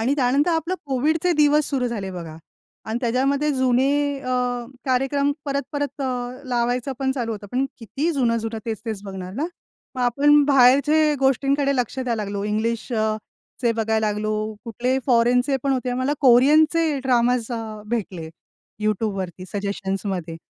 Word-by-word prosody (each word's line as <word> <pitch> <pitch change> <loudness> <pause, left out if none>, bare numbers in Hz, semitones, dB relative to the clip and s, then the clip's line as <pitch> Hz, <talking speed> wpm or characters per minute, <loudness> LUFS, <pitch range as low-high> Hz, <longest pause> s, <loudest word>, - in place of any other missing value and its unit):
आणि 255 +6 +1
त्यानंतर 275 +4 +2
आपलं 330 +2 0
कोविडचे 310 +6 +1
दिवस 300 -1 +3
सुरू 260 -3 0
झाले, 205 -5 -4
बघा. 170 -4 -7 0.5
आणि 220 +2 -2
त्याच्यामध्ये 270 +4 +1
जुने 260 +1 +2 0.3
अ, 255 - -5 0.5
कार्यक्रम 270 +2 +1
परत-परत 280 0 -3
अ, 250 0 -3
लावायचं 245 +2 0
पण 265 -1 0
चालू 240 -4 -3
होतं. 205 -1 -7
पण 260 +2 +1
किती 255 - -2
जुनं-जुनं, 230 -4 0
तेच-तेच 220 -2 -4
बघणार 190 -2 -7
ना. 300 +6 -1 0.5
मग 255 - -4
आपण 290 +4 +4
बाहेरच्या 285 +3 +5
गोष्टींकडे 275 +1 +2
लक्ष 250 +2 -2
द्यायला 235 -4 -1
लागलो. 200 0 -4
इंग्लिश 225 +3 -2
अ, 215 -1 +1 0.4
चे 240 -3 +2
बघायला 220 -1 0
लागलो. 210 +1 -1 0.3
कुठले 245 +3 -1
फॉरेनचे 250 +2 +3
पण 275 - +1
होते. 255 -1 -1
मला 255 +3 0
कोरियनचे 300 +4 +5
ड्रामाज 245 -1 +2
अ, 220 -2 -5
भेटले 195 -8 -3 0.5
YouTubeवरती 195 -4 -2
सजेशन्समध्ये. 195 -4 -3
250 Hz, 140 wpm, -22 LUFS, 220-275 Hz, 0.5 s, बाहेरच्या